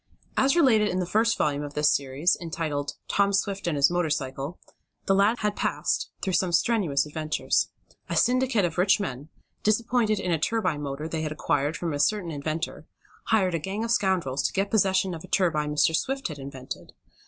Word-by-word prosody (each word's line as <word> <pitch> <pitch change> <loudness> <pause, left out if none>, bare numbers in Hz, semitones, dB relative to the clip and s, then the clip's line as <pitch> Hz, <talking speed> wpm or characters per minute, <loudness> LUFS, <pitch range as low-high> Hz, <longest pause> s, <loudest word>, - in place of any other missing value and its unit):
As 275 +4 +3
related 240 -10 +4
in 180 - -1
the 185 - 0
first 225 +6 +2
volume 145 -1 0
of 145 -1 -7
this 150 0 +4
series, 140 +5 +1
entitled 150 -4 -3
"Tom 200 0 +2
Swift 200 -1 -1
and 165 - 0
His 140 +4 +4
Motor 175 -2 0
Cycle," 135 +3 -3 0.5
the 195 - +3
lad 200 +4 +3
had 210 -1 0
passed - - -1
through 190 - -1
some 180 0 +2
strenuous 170 -7 +2
adventures. 155 +1 0 0.4
A - - -1
syndicate 250 -5 +2
of 170 0 -3
rich 190 +3 +4
men, 145 -6 -5 0.3
disappointed 220 0 +1
in 180 - -2
a 165 - +1
turbine 165 -5 0
motor 145 +2 -4
they 160 0 -3
had 155 -1 -3
acquired 150 0 0
from 170 -3 -3
a 145 - -3
certain 180 +2 +1
inventor, 155 +2 -4 0.4
hired 190 -5 +2
a 165 - 0
gang 195 +7 -3
of 230 - -2
scoundrels 185 - +1
to - - -8
get 195 +1 -1
possession 190 -3 +2
of 160 - -7
a - - -10
turbine 150 -5 +1
Mr. 150 +2 +3
Swift 270 +4 -1
had 150 -2 -7
invented. 135 -1 -8
175 Hz, 195 wpm, -26 LUFS, 150-205 Hz, 0.5 s, related